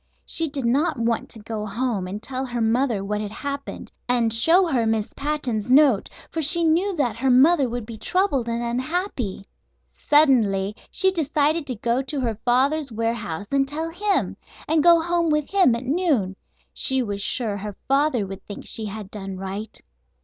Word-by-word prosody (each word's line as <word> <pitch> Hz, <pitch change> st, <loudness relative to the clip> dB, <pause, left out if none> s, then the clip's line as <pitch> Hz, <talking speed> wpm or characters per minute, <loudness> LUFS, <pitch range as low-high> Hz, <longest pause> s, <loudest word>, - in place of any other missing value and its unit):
She 325 Hz, -1 st, +1 dB
did 275 Hz, -3 st, -4 dB
not 285 Hz, +6 st, +1 dB
want 230 Hz, 0 st, -1 dB
to -, -, -9 dB
go 220 Hz, 0 st, -5 dB
home 215 Hz, -3 st, -2 dB
and 205 Hz, +3 st, -6 dB
tell 260 Hz, 0 st, -4 dB
her 245 Hz, -2 st, -4 dB
mother 225 Hz, -2 st, +1 dB
what 210 Hz, +1 st, -2 dB
had 210 Hz, -, -4 dB
happened, 280 Hz, +5 st, -6 dB, 0.2 s
and 235 Hz, -3 st, +2 dB
show 330 Hz, +11 st, +4 dB
her 250 Hz, -9 st, 0 dB
Miss 220 Hz, -1 st, -1 dB
Patten's 265 Hz, -7 st, -2 dB
note, 265 Hz, -5 st, +4 dB, 0.2 s
for 325 Hz, -, -2 dB
she 335 Hz, +3 st, +2 dB
knew 350 Hz, +5 st, +2 dB
that 250 Hz, -9 st, 0 dB
her 265 Hz, +3 st, 0 dB
mother 270 Hz, +2 st, +5 dB
would 240 Hz, -1 st, -4 dB
be 220 Hz, -1 st, -9 dB
troubled 325 Hz, -, 0 dB
and 235 Hz, +1 st, -2 dB
unhappy. 250 Hz, -, -3 dB, 0.5 s
Suddenly 220 Hz, -10 st, +3 dB
she 380 Hz, -1 st, +3 dB
decided 305 Hz, -2 st, +1 dB
to 255 Hz, -, -3 dB
go 235 Hz, +4 st, 0 dB
to 275 Hz, +2 st, -4 dB
her 225 Hz, -4 st, -2 dB
father's 270 Hz, +3 st, +2 dB
warehouse 220 Hz, -5 st, -3 dB
and 275 Hz, -1 st, +2 dB
tell 320 Hz, +3 st, -4 dB
him, 395 Hz, +3 st, 0 dB, 0.3 s
and 315 Hz, 0 st, +3 dB
go 340 Hz, +1 st, +6 dB
home 340 Hz, 0 st, 0 dB
with 300 Hz, -1 st, +1 dB
him 370 Hz, -12 st, +4 dB
at 235 Hz, +2 st, -5 dB
noon. 275 Hz, -, 0 dB, 0.4 s
She 265 Hz, -1 st, +2 dB
was 200 Hz, -3 st, -3 dB
sure 215 Hz, -1 st, 0 dB
her 205 Hz, 0 st, -7 dB
father 275 Hz, -5 st, +2 dB
would 195 Hz, 0 st, -9 dB
think 205 Hz, -, -8 dB
she 220 Hz, -, 0 dB
had 210 Hz, -1 st, -7 dB
done 195 Hz, -2 st, -6 dB
right. 195 Hz, +3 st, -6 dB
250 Hz, 180 wpm, -23 LUFS, 220-300 Hz, 0.5 s, go